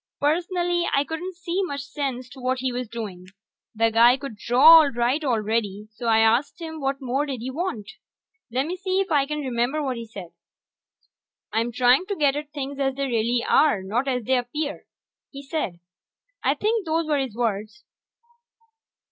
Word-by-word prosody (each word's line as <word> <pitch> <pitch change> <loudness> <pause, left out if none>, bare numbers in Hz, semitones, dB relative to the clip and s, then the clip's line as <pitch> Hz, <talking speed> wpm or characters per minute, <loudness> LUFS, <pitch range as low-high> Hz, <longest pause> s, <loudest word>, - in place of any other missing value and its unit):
Personally, 345 +3 0
I 275 - +3
couldn't 340 +5 -6
see 350 +2 -2
much 285 -7 -3
sense 275 -3 -4
to 265 - -13
what 255 +1 -1
he 255 0 -2
was 245 -2 -4
doing. 200 -6 -7 0.5
The 225 +1 +2
guy 235 +3 +6
could 275 -4 -7
draw 275 +10 +7
all 295 - +2
right 245 +5 0
already, 215 -4 -1
so 235 +2 -6
I 225 -1 +4
asked 230 +9 +2
him 320 -1 -6
what 275 0 -2
more 270 +4 -1
did 260 -5 -4
he 255 +2 -4
want? 285 - -4 0.6
Lemme 270 +9 -1
see 375 0 -1
if 390 0 -1
I 280 -3 +3
can 300 0 -3
remember 260 +3 -1
what 260 -3 -2
he 230 -1 -7
said. 195 -6 -9 1.2
"I'm 230 +2 0
trying 250 +9 +3
to 405 - -2
get 285 -5 +2
at 295 0 -5
things 280 -1 -5
as 270 -1 0
they 275 0 -1
really 235 -1 0
are, 280 -10 +3
not 230 +8 -1
as 250 -3 -1
they 255 +3 +2
appear," 290 +5 -4 0.4
he 275 0 -10
said. 270 - -3 0.6
I - - +2
think 440 0 0
those 325 +1 +1
were 300 -2 +1
his 260 -5 -3
words. 220 0 -3
265 Hz, 180 wpm, -24 LUFS, 235-300 Hz, 1.2 s, draw